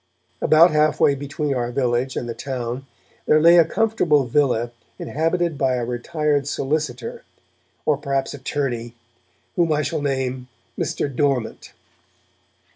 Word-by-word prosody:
About 165 +3 +6
half 155 0 +2
way 140 - +5
between 140 +1 -3
our 120 -2 -2
village 125 0 0
and 120 - -3
the 115 - -3
town 130 0 -5 0.4
there 155 - +5
lay 170 +2 +7
a 165 - +6
comfortable 180 -8 +2
villa 120 -3 +1 0.3
inhabited 165 0 -1
by 130 -1 +2
a 120 -1 -2
retired 145 +4 -1
solicitor, 155 - -3 0.6
or 150 -2 +2
perhaps 140 -1 -2
attorney, 130 -4 -3 0.6
whom 170 -2 +2
I 150 0 +1
shall 155 +2 -2
name 130 -2 -2 0.3
Mr. - - -2
Dormant. 135 -5 -1
140 Hz, 130 wpm, -22 LUFS, 125-155 Hz, 0.6 s, lay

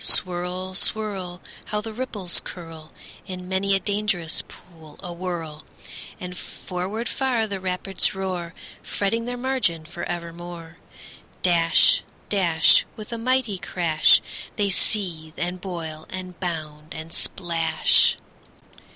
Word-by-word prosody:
Swirl, 180 +1 0
swirl! 190 -3 -1 0.2
How 210 - -1
the 220 +1 -5
ripples 215 -7 -1
curl 165 -3 -9 0.4
In 180 -1 -6
many 195 +1 +2
a - - +3
dangerous 200 -5 +1
pool 160 -4 -14
awhirl! 170 -3 -4 0.6
And 180 0 -5
forward 190 +6 -4
far 250 -4 +1
the 200 -2 -3
rapids 185 +1 +1
roar, 185 -3 -3 0.3
Fretting 225 +3 0
their 245 0 -3
margin 240 -11 +1
for 170 - -7
evermore. 170 -1 -6 0.7
Dash, 170 -2 +5 0.3
dash, 175 -5 +5
With 215 +1 -7
a 230 - -3
mighty 240 -5 +1
crash, 165 -4 +4 0.3
They 200 -1 +1
seethe, 170 -6 -1
and 180 +1 -2
boil, 165 -4 -5
and 185 -2 -6
bound, 155 -2 -4
and 160 +1 -6
splash. 165 -3 +3
180 Hz, 115 wpm, -25 LUFS, 165-200 Hz, 0.7 s, Dash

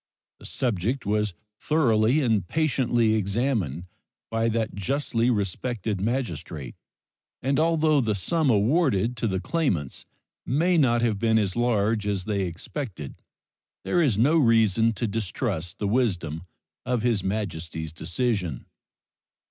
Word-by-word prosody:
The - - -13
subject 120 0 -1
was 105 -2 0 0.2
thoroughly 130 -3 +2
and 110 -8 +1
patiently 125 - +1
examined 100 - -1 0.5
by 115 0 +1
that 110 -1 -1
justly 120 +2 0
respected 105 -1 -2
magistrate, 85 - -3 0.7
and 135 +2 +1
although 155 -2 +3
the 110 -3 0
sum 155 - 0
awarded 120 - +2
to 115 - -1
the 95 -2 -1
claimants 100 - -2 0.4
may 165 +8 +1
not 120 -4 +3
have 110 -4 +1
been 110 0 +3
as 100 -4 0
large 110 -3 +1
as 100 -3 -1
they 100 -1 -1
expected 90 - -7 0.6
there 175 - +1
is 130 -11 +2
no 145 +9 +4
reason 115 - +4
to 110 - -2
distrust 100 -4 -3
the 105 - -2
wisdom 90 -8 -1 0.4
of 125 -3 -1
His 115 -6 +1
Majesty's 80 -6 -3
decision. 85 - -2
110 Hz, 125 wpm, -25 LUFS, 95-125 Hz, 0.7 s, no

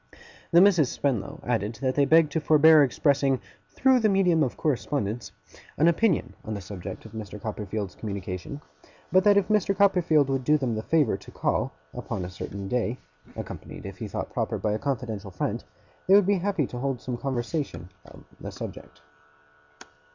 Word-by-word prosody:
The 170 - +6
Misses 175 -9 +5
Spenlow 120 -9 -2
added 115 -2 -1
that 130 +2 -1
they 140 0 +3
begged 160 +1 +5
to 160 - -1
forbear 155 +1 +6
expressing, 140 0 +2 0.3
'through 265 -1 +3
the 220 -2 +3
medium 180 -5 +3
of 130 -5 0
correspondence', 120 -6 -2 0.5
an 155 - +4
opinion 170 +1 +2
on 110 - -4
the - - -4
subject 95 -1 -8
of - - -11
Mr. 105 -2 -7
Copperfield's 105 -2 -4
communication; 100 +5 -6 0.5
but 185 0 +5
that 205 -1 +6
if 200 - +2
Mr. 205 -2 +1
Copperfield 175 -7 +4
would 135 -1 -1
do 150 +3 +4
them 130 -5 -1
the 110 - -2
favour 145 -7 +2
to 95 - -14
call, - - -1 0.2
upon 90 - -4
a 90 - -7
certain 100 +2 -6
day 125 +1 -1 0.4
(accompanied, - - -8
if - - -8
he - - -4
thought - - -5
proper, - - -1
by 105 - -1
a 105 - -1
confidential 115 -7 -3
friend), 95 - -3 0.4
they 190 - +7
would 205 -2 +6
be 200 0 +2
happy 190 -5 0
to 125 - -7
hold 135 -1 -2
some 125 0 -4
conversation 130 - -4 0.2
on - - -15
the - - -7
subject. 75 0 -9
135 Hz, 180 wpm, -26 LUFS, 110-165 Hz, 0.5 s, they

